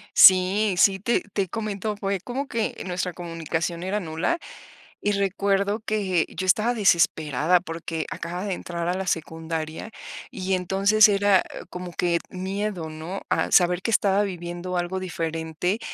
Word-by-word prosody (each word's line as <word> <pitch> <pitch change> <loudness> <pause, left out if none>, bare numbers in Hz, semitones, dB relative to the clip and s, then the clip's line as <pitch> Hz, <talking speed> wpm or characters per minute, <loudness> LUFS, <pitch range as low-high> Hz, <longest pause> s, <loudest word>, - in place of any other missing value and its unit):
Sí, 190 +2 +7
sí, 195 -1 +5
te 235 +4 +1
te 195 -3 0
comento. 210 0 -3
Fue 195 -2 -2
como 265 +6 -4
que 225 -1 -1
nuestra 180 0 -2
comunicación 165 0 -3
era 200 +3 -1
nula, 165 - -1 0.6
y 205 - +1
recuerdo 200 +1 +1
que 195 -6 0
yo 185 - -5
estaba 215 +6 +3
desesperada, 165 - +3
porque 165 -2 -4
acababa 175 +3 -4
de 195 - -1
entrar 170 -1 -4
a - - +1
la 190 0 -3
secundaria, 160 +4 -3 0.4
y 190 +1 -3
entonces 195 +4 +4
era, 200 -1 +4
ah, - - -7
como 180 -1 -7
que 170 -1 +1
miedo, 190 -2 -3
¿no?, 160 +5 -6
a - - +1
saber 180 0 +4
que 230 - -1
estaba 200 -1 +3
viviendo 175 -1 -5
algo 175 +2 -2
diferente. 165 +2 -2
185 Hz, 150 wpm, -25 LUFS, 170-200 Hz, 0.6 s, Sí